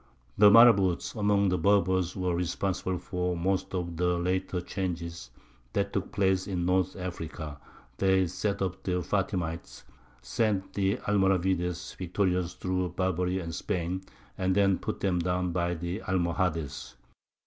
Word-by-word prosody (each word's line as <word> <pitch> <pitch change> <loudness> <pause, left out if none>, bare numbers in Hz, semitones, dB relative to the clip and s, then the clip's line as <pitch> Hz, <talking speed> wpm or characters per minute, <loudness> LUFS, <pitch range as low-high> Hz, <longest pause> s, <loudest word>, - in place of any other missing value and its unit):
The 105 0 +7
marabouts 100 -5 +6
among 100 -2 +2
the 90 - 0
Berbers 95 -3 +2
were 90 -2 -1
responsible 90 +1 -1
for 90 0 -2
most 95 +2 -1
of 85 -2 -3
the 90 0 +1
later 90 +1 -1
changes 85 -5 -4 0.4
that 100 0 -1
took 100 -1 -2
place 95 -2 +1
in 90 -3 -2
North 95 0 +1
Africa: 80 -5 -6 0.4
they 95 -1 +3
set 100 +3 -2
up 95 0 -3
the 90 -2 -1
Fatimites, 85 -9 -2 0.4
sent 100 - -1
the 100 +2 +1
Almoravides 95 -3 +1
victorious 90 -1 -1
through 90 -1 -1
Barbary 90 0 0
and 85 -3 -4
Spain, 90 -1 -2 0.4
and 95 0 +1
then 100 -2 +3
put - - -4
them 90 -3 +1
down 90 +1 0
by 85 0 0
the 85 +5 -4
Almohades. 85 -8 -1
90 Hz, 135 wpm, -29 LUFS, 85-95 Hz, 0.4 s, The